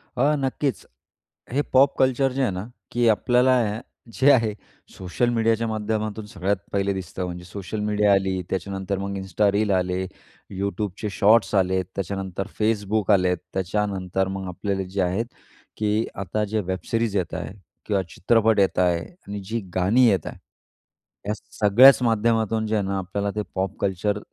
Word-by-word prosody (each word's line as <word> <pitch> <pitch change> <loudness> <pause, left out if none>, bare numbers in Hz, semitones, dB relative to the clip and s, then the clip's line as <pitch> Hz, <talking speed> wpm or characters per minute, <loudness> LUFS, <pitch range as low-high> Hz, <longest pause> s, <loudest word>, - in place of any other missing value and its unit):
अ, 145 +4 +3
नक्कीच 135 0 -2 0.7
हे 145 - +2
pop 135 +2 +5
culture 130 0 +3
जे 135 - -2
आहे 125 -7 +2
ना, 95 +5 -5 0.2
की 120 -1 +2
आपल्याला 125 +3 +4 0.6
जे 140 +2 +6
आहे 115 -5 +3 0.4
सोशल 95 +6 -1
मीडियाच्या 115 -1 +1
माध्यमातून 110 0 -2
सगळ्यात 100 -1 -1 0.2
पहिले 100 0 +1
दिसतं. 90 0 -5
म्हणजे 90 0 -6
सोशल 100 +3 -6
मीडिया 105 -1 +2
आली, 95 -1 +1
त्याच्यानंतर 95 +1 -3
मग 100 0 -4
इन्स्टा 95 +2 +1
रील 105 0 +1
आले, 90 0 0 0.6
YouTubeचे 100 +1 -3
शॉट्स 110 +3 +4
आलेत, 95 -1 +2
त्याच्यानंतर 95 0 -4
Facebook 105 -1 +1
आलेत, 90 -2 +2 0.2
त्याच्यानंतर 95 0 -1
मग 95 0 -5
आपल्याला 95 +2 -2
जे 95 - +2
आहेत 90 +6 0 0.5
की 105 +1 +1 0.2
आता 105 +2 -2
जे 110 +1 -1
वेबसिरीज 100 +4 -2
येत 90 -3 -2
आहे - - -5 0.3
किंवा 100 -3 +1
चित्रपट 110 +1 +2
येत 95 -1 +2
आहे 90 -2 +3 0.3
आणि 100 0 -5
जी 115 +1 -1 0.2
गाणी 100 +8 +4
येत 95 -7 +2
आहे, - - -7 0.9
या - - +2 0.3
सगळ्याच 125 +6 +7
माध्यमातून 115 -1 +1
जे 110 - 0
आहे 105 - +1
ना, 100 - -1
आपल्याला 100 +2 -2
ते 105 - 0
पॉप 95 +1 -2
कल्चर 100 +1 0
100 Hz, 155 wpm, -24 LUFS, 95-110 Hz, 0.9 s, सगळ्याच